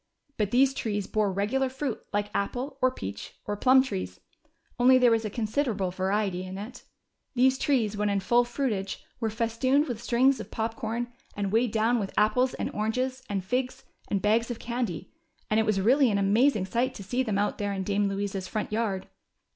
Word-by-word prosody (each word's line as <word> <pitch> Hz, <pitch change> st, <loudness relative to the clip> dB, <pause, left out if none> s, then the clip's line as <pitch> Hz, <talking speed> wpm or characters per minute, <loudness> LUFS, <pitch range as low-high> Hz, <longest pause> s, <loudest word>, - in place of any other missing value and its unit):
But 210 Hz, -3 st, 0 dB
these 260 Hz, +4 st, +4 dB
trees 210 Hz, -7 st, -2 dB
bore 210 Hz, -1 st, 0 dB
regular 225 Hz, +8 st, 0 dB
fruit 265 Hz, -2 st, -4 dB
like 205 Hz, 0 st, -1 dB
apple, 255 Hz, +7 st, -3 dB
or 255 Hz, -, +5 dB
peach, 100 Hz, -, -7 dB
or 205 Hz, -, -2 dB
plum 260 Hz, +5 st, +5 dB
trees, 90 Hz, -, -5 dB, 0.6 s
only 255 Hz, +1 st, +7 dB
there 250 Hz, -2 st, +5 dB
was 225 Hz, -1 st, +2 dB
a -, -, -1 dB
considerable 215 Hz, -3 st, -1 dB
variety 190 Hz, 0 st, -1 dB
in 185 Hz, +1 st, -7 dB
it. 210 Hz, +5 st, -8 dB, 0.5 s
These 260 Hz, +1 st, +4 dB
trees 230 Hz, -7 st, +1 dB
when 210 Hz, 0 st, 0 dB
in 200 Hz, -1 st, +1 dB
full 240 Hz, +5 st, +3 dB
fruitage 240 Hz, -6 st, -3 dB
were 225 Hz, -2 st, 0 dB
festooned 235 Hz, +6 st, +1 dB
with 235 Hz, -4 st, -4 dB
strings 255 Hz, +3 st, +3 dB
of -, -, -7 dB
pop 225 Hz, 0 st, -2 dB
corn, 240 Hz, 0 st, -3 dB, 0.2 s
and 200 Hz, -1 st, -1 dB
weighed 230 Hz, +1 st, +2 dB
down 225 Hz, +2 st, +2 dB
with 195 Hz, -2 st, -5 dB
apples 235 Hz, +5 st, +3 dB
and -, -, -3 dB
oranges 255 Hz, +5 st, -1 dB
and 195 Hz, -2 st, -2 dB
figs 250 Hz, +5 st, -2 dB, 0.2 s
and 200 Hz, -2 st, -1 dB
bags 225 Hz, +3 st, +2 dB
of 240 Hz, -, -3 dB
candy, 235 Hz, -9 st, -4 dB, 0.4 s
and 215 Hz, -, +4 dB
it 220 Hz, -, +1 dB
was 210 Hz, -2 st, +2 dB
really 255 Hz, +6 st, +4 dB
an 205 Hz, -, +1 dB
amazing 210 Hz, +2 st, +3 dB
sight 245 Hz, +6 st, -1 dB
to 200 Hz, -, -8 dB
see 245 Hz, +7 st, -1 dB
them 220 Hz, -6 st, -1 dB
out 205 Hz, +1 st, 0 dB
there 205 Hz, -1 st, -1 dB
in 195 Hz, -1 st, -2 dB
Dame 205 Hz, +1 st, +1 dB
Louisa's 195 Hz, -1 st, -3 dB
front 215 Hz, -2 st, -3 dB
yard. 215 Hz, -4 st, -1 dB
220 Hz, 195 wpm, -27 LUFS, 200-250 Hz, 0.6 s, only